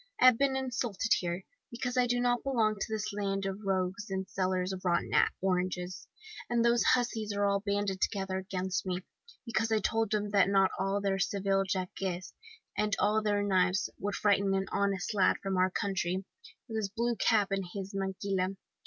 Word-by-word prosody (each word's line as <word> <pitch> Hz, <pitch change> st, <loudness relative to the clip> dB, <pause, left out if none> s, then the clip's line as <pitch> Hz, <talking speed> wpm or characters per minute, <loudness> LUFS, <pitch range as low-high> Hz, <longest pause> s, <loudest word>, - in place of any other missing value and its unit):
I -, -, +5 dB
have 255 Hz, -3 st, +7 dB
been 275 Hz, -1 st, +2 dB
insulted 240 Hz, -4 st, -2 dB
here, 175 Hz, +1 st, -3 dB, 0.3 s
because 245 Hz, 0 st, -3 dB
I 250 Hz, -1 st, +3 dB
don't 245 Hz, 0 st, +1 dB
belong 230 Hz, -6 st, +2 dB
to -, -, -2 dB
this 215 Hz, -1 st, -3 dB
land 195 Hz, -1 st, -1 dB
of 195 Hz, 0 st, -3 dB
rogues 190 Hz, +2 st, -1 dB
and 190 Hz, 0 st, -3 dB
sellers 185 Hz, 0 st, -1 dB
of 185 Hz, -, -7 dB
rotten 170 Hz, -2 st, +1 dB, 0.3 s
oranges; 180 Hz, -1 st, -1 dB, 0.4 s
and 235 Hz, -1 st, +2 dB
those 235 Hz, 0 st, +4 dB
hussies 230 Hz, -4 st, +1 dB
are 205 Hz, 0 st, +1 dB
all 200 Hz, 0 st, +2 dB
banded 200 Hz, -1 st, -1 dB
together 190 Hz, -2 st, -1 dB
against 190 Hz, -1 st, -2 dB
me, 185 Hz, -1 st, -3 dB, 0.4 s
because 225 Hz, -1 st, 0 dB
I 220 Hz, -, +4 dB
told 225 Hz, +1 st, 0 dB
them 210 Hz, -1 st, -1 dB
that 200 Hz, -1 st, +4 dB
not 195 Hz, -1 st, +4 dB
all 195 Hz, +1 st, 0 dB
their 195 Hz, -1 st, 0 dB
Seville 195 Hz, 0 st, +1 dB
jacques, 185 Hz, -1 st, -3 dB, 0.7 s
and 210 Hz, -1 st, +1 dB
all 215 Hz, +1 st, +2 dB
their 205 Hz, -1 st, +1 dB
knives, 185 Hz, -1 st, +2 dB
would 205 Hz, 0 st, -2 dB
frighten 200 Hz, -2 st, +2 dB
an 190 Hz, 0 st, 0 dB
honest 200 Hz, 0 st, 0 dB
lad 195 Hz, -3 st, +3 dB
from 195 Hz, -1 st, -1 dB
our 185 Hz, 0 st, +3 dB
country, 190 Hz, -1 st, -1 dB, 0.4 s
with 225 Hz, -2 st, -4 dB
his 210 Hz, -3 st, -1 dB
blue 235 Hz, +3 st, -1 dB
cap 210 Hz, -1 st, +2 dB
and 195 Hz, -1 st, 0 dB
his 195 Hz, 0 st, -5 dB
maquila! 195 Hz, -1 st, -1 dB
200 Hz, 180 wpm, -31 LUFS, 190-220 Hz, 0.7 s, have